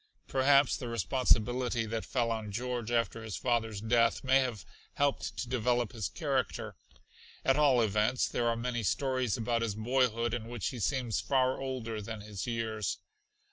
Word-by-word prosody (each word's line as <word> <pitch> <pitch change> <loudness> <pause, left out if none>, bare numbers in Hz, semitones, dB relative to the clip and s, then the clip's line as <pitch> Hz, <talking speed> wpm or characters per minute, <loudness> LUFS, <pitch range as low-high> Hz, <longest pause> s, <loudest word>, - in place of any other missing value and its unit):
Perhaps 140 0 +4
the 125 - -6
responsibility 120 +2 +1
that 110 +1 -3
fell 120 -3 0
on 110 -2 -3
George 120 +1 -3
after 115 -1 0
his 110 -3 -5
father's 115 -4 0
death 115 +2 +2
may 130 +1 +5
have 125 -7 -2 0.3
helped 140 -1 0
to 125 - -3
develop 120 -2 +1
his 110 -5 -3
character. 140 -5 -2 0.7
At 135 - +4
all 135 -5 +5
events 110 +4 +1
there 120 - -1
are 115 - +2
many 120 0 -2
stories 130 - 0
about 115 0 0
his 110 -3 -1
boyhood 120 0 +1
in 115 -2 -3
which 120 -3 -3
he 125 - -7
seems 125 -1 0
far 130 -1 +1
older 120 -5 -4
than 110 0 -6
his 105 -1 -6
years. 110 -3 -2
120 Hz, 165 wpm, -31 LUFS, 110-130 Hz, 0.7 s, may